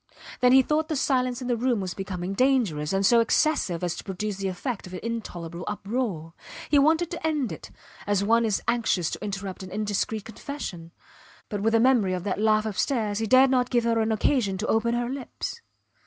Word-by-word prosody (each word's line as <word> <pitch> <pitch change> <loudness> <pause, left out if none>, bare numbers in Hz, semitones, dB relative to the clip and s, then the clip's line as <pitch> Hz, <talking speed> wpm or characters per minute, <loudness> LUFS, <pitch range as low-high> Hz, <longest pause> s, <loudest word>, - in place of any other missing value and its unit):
Then 250 0 +5
he 265 +1 +7
thought 305 +3 0
the 310 - -2
silence 255 -2 0
in - - -4
the 245 - +1
room 240 -1 +1
was 185 -2 -3
becoming 190 -1 -4
dangerous, 205 - +1
and 195 0 +1
so 235 +3 +6
excessive 225 - +1
as 175 -1 -1
to - - -7
produce 200 +1 -4
the 195 -1 -2
effect 195 +3 -4
of 180 - -8
an - - -5
intolerable 180 -7 -5
uproar. 200 -6 -3 0.4
He 290 - +6
wanted 320 +4 +3
to 340 - -6
end 290 - -1
it, 160 - -8 0.4
as 205 -1 +2
one 230 +3 +3
is 215 -3 0
anxious 210 -8 +1
to - - -6
interrupt 195 -2 -5
an 190 - -8
indiscreet 210 +1 -2
confession; 210 - -7 0.6
but 205 -2 -3
with 225 +2 +1
the 225 - +5
memory 230 -6 +3
of 180 - -5
that 205 +1 -2
laugh 215 0 +3
upstairs 215 0 -1
he 225 - -1
dared 260 +3 +6
not 250 -1 +2
give 240 -2 +2
her 230 -1 +1
an 220 0 +1
occasion 215 -3 +1
to 210 - -3
open 235 +1 +1
her 240 0 -1
lips. 270 - -6
220 Hz, 210 wpm, -26 LUFS, 195-250 Hz, 0.6 s, he